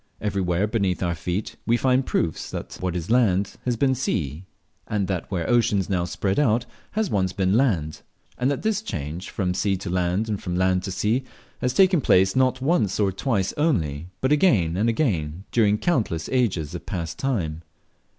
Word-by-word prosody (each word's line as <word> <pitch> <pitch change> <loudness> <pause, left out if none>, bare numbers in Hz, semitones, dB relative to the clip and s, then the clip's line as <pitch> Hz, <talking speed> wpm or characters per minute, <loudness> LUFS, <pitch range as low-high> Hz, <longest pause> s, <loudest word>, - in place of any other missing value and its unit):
Everywhere 95 -2 0
beneath 100 -5 0
our 85 -1 0
feet 90 +5 -4
we 120 +1 +4
find 130 +1 +2
proofs 80 - -1
that - - -6
what 90 -1 -2
is 90 +4 -3
land 100 -6 +3
has 125 -1 +1
been 135 +2 +3
sea, 80 - -2 0.4
and 100 -3 -1
that 90 -3 -3
where 90 -4 -2
oceans 110 -5 +2
now 90 -2 +1
spread 90 - -1
out 120 -4 +2 0.3
has 215 -2 0
once 95 -2 +1
been 95 -1 +1
land; 95 - +1 0.3
and 125 +2 0
that 140 - -2
this 215 -1 +1
change 80 - -5
from 90 -3 -1
sea 95 +1 0
to 90 -1 -5
land, 90 +4 0
and 105 -3 -3
from 90 -2 -3
land 95 0 +2
to 95 - -4
sea, 105 +8 0 0.4
has 125 - 0
taken 185 -4 +5
place, 95 -5 +4
not 130 0 +2
once 135 - +1
or 100 -2 +3
twice 95 -1 -1
only, 85 - 0
but 130 - +1
again 110 - +3
and 105 +5 +2
again, 90 - -1
during 105 -3 +3
countless 110 - 0
ages 100 - 0
of - - -7
past 85 -2 -4
time. 85 - -1
100 Hz, 185 wpm, -24 LUFS, 90-125 Hz, 0.4 s, taken